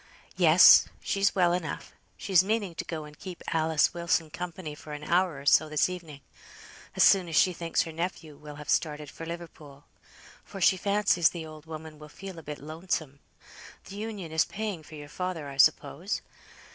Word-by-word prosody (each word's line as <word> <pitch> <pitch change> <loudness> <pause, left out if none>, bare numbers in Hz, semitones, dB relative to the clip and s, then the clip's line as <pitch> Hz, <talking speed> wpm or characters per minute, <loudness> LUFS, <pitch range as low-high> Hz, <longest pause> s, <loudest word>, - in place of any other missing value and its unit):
"Yes, - - +7
she's 200 0 0
well 175 -2 +3
enough. 170 -5 -4 0.2
She's 185 -2 +3
meaning 205 -3 -1
to 165 - -5
go 160 -2 -5
and 150 0 -13
keep 185 -3 -9
Alice 160 -1 +2
Wilson 170 -2 0
company 175 -2 -6
for 150 0 -10
an 150 0 -7
hour 175 -2 +1
or 140 - -12
so 155 +2 +4
this 150 +3 +2
evening; 165 -6 -8 0.7
as - - +4
soon 185 -3 +5
as 160 - -4
she 185 - +4
thinks 170 -1 -1
her 165 - -7
nephew 165 -2 -5
will 150 0 -11
have 150 0 -10
started 150 -3 -1
for 165 - -9
Liverpool; 155 -4 -9 0.6
for 195 - -10
she 190 - +5
fancies 200 -3 +2
the 170 -2 -7
old 155 0 -12
woman 155 -1 -9
will 150 0 -12
feel 190 +2 -9
a - - -10
bit 150 -1 -7
lonesome. 155 -2 -4 0.7
Th' - - -12
Union 205 -4 -6
is 160 0 +3
paying 210 -5 -5
for 155 +1 -13
your 145 -1 -9
father, 175 -1 -4
I 140 -1 -9
suppose?" - - +2
165 Hz, 185 wpm, -28 LUFS, 150-180 Hz, 0.7 s, Yes